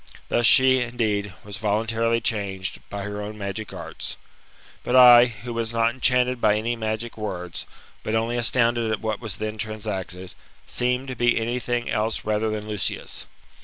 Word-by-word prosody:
Thus 120 -1 +3
she, 130 0 +7
indeed, 105 -5 -2
was 105 -1 -6
voluntarily 115 +2 0
changed, 100 -4 -2
by 100 -1 -5
her 105 +1 -5
own 105 +1 -7
magic 100 +1 -5
arts. - - -6 0.7
But 125 - 0
I, 125 -1 +9
who 120 0 -7
was 115 0 -2
not 115 0 +2
enchanted 125 0 +1
by 105 -1 +4
any 115 +3 -1
magic 110 0 -4
words, 90 -5 -5 0.3
but 110 - -2
only 115 +2 0
astounded 120 -1 +2
at 110 - -2
what 110 -2 -2
was 110 -4 -5
then 110 0 -4
transacted, 100 -4 -5 0.3
seemed 125 +2 -1
to 130 - -4
be 120 0 +2
anything 120 +1 -2
else 110 0 -1
rather 110 +1 0
than 105 0 -4
Lucius. 105 -4 -4
110 Hz, 165 wpm, -24 LUFS, 105-120 Hz, 0.7 s, I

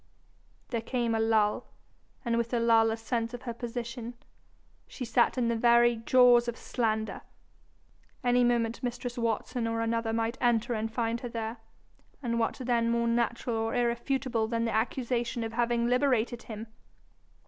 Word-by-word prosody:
There 230 -2 -2
came 235 0 -1
a 225 - +1
lull, 220 -2 +2 0.6
and 235 -1 +1
with 235 0 0
the 240 - 0
lull 225 -1 +4
a 220 - -2
sense 230 +1 -2
of 245 - -10
her 235 - -4
position: 235 0 -6 0.7
she 255 - -6
sat 235 +2 +2
in 245 -2 +1
the 235 - +1
very, 235 0 +4
jaws 245 +1 +5
of 240 - -3
slander! 220 -3 -2 1.0
Any 245 0 +3
moment 235 -1 +1
mistress 245 0 -4
Watson 230 0 -1
or 230 0 -1
another 230 0 0
might 225 +2 -1
enter 240 -1 +2
and 220 0 -2
find 230 0 -1
her 245 - -5
there, 230 0 -4 0.7
and 235 -1 -1
what 225 - 0
then 235 -2 +1
more 235 0 +1
natural 235 0 0
or 225 0 -1
irrefutable 240 -1 0
than 230 0 -1
the 230 - -1
accusation 235 +1 -1
of 225 0 -5
having 235 0 +1
liberated 245 -2 +1
him? 220 -2 -7
235 Hz, 160 wpm, -29 LUFS, 225-240 Hz, 1.0 s, jaws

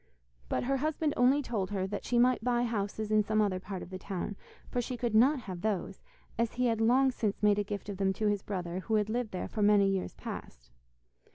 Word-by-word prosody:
But - - 0
her 270 +2 +1
husband 305 +1 0
only 265 +4 +4
told 205 -7 -2
her 195 -2 -1
that 200 +1 -5
she 245 - +1
might 245 -1 +4
buy 240 0 +2
houses 215 -2 -2
in 215 0 +5
some 215 +1 0
other 200 -3 +1
part 185 0 -6
of 180 - -11
the 185 - -6
town, 195 +1 -4 0.3
for 245 - -1
she 245 +1 -4
could 235 -2 -1
not 255 +5 +5
have 185 -5 -7
those, 195 -2 -2 0.4
as 230 -1 +1
he 250 +1 0
had 225 -2 +1
long 260 +4 +4
since 215 -4 -2
made 210 0 +4
a - - +1
gift 205 0 -5
of 200 -2 -5
them 195 0 +2
to 215 - -3
his 205 -1 +1
brother, 180 -3 -4
who 220 +3 -1
had 210 0 +1
lived 240 -1 -1
there 185 -3 -4
for 215 - -4
many 205 -1 +5
years 195 -1 -1
past. - - -8
210 Hz, 240 wpm, -31 LUFS, 195-240 Hz, 0.4 s, in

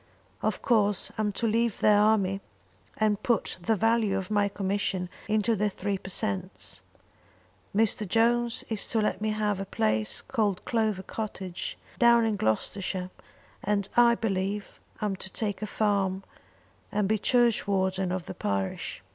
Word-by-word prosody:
Of - - -1
course 210 -5 +2
I'm 210 -1 +1
to 230 - -2
leave 230 0 +1
the 215 - +5
army 205 -2 +3 0.6
and 215 -1 +1
put 235 -7 0
the 220 +6 +2
value 225 -2 +2
of 190 +1 -5
my 205 -1 +3
commission 195 -2 -1 0.2
into 215 +1 +2
the 210 +1 +1
three 200 0 -3
per 190 - -9
cents. 100 - -2 0.9
Mr. 215 -1 +2
Jones 235 +2 +2
is 220 -3 -3
to 225 - 0
let 210 -2 0
me 215 - 0
have 210 -2 0
a 195 - -3
place 110 - +1
called 210 -7 -1
Clover 215 -5 0
Cottage, 190 -5 -5 0.2
down 235 -1 +6
in 220 -2 +1
Gloucestershire, 185 - -1 0.5
and, 200 -1 0
I 235 -1 +6
believe, 200 -2 -2 0.2
I'm 210 -2 0
to 190 - -7
take 205 +1 -3
a 215 - -2
farm 195 -3 0 0.7
and 210 -2 +1
be 215 +1 +1
churchwarden 195 -6 +2
of 185 -1 -3
the - - -6
parish. 100 -2 -3
205 Hz, 150 wpm, -28 LUFS, 190-220 Hz, 0.9 s, down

